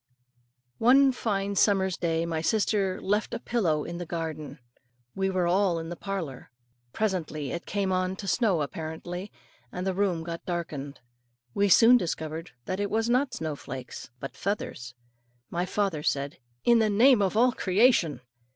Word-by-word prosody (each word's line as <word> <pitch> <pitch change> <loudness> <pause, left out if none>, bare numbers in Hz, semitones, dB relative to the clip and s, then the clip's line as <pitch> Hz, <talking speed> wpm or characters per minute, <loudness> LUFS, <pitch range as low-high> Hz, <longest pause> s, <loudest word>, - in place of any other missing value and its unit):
One 270 +3 +6
fine 200 -5 -2
summer's 190 -2 +3
day 165 -1 0
my 165 -1 -2
sister 200 0 +1
left 210 +3 -1
a - - -4
pillow 170 -12 0
in 170 +1 -6
the 175 - -4
garden. 160 -3 -5 0.6
We 190 0 0
were 185 -2 0
all 180 0 +2
in 165 0 -5
the 175 - -5
parlour. 170 -10 -5 0.4
Presently 160 - -2
it 170 - -5
came 200 -2 -1
on 185 0 0
to 195 - -7
snow 190 - +2
apparently, 165 +6 -6 0.4
and 180 +1 -4
the 190 - 0
room 185 -4 0
got 170 0 -6
darkened. 155 -5 -5 0.5
We 200 0 +2
soon 230 +6 +7
discovered 160 -3 -4 0.2
that 185 +1 -3
it 205 0 -1
was 225 +2 0
not 260 +2 +1
snow 155 -2 -3
flakes, 130 -3 -8
but 135 - -7
feathers. 125 -11 -4 0.6
My 175 +2 -1
father 195 -6 -1
said, 140 +2 -1 0.2
"In 235 -1 +5
the 220 -1 +3
name 235 +3 +5
of 195 +1 +1
all 250 +2 +5
creation!" 190 - +2
185 Hz, 160 wpm, -27 LUFS, 160-205 Hz, 0.6 s, soon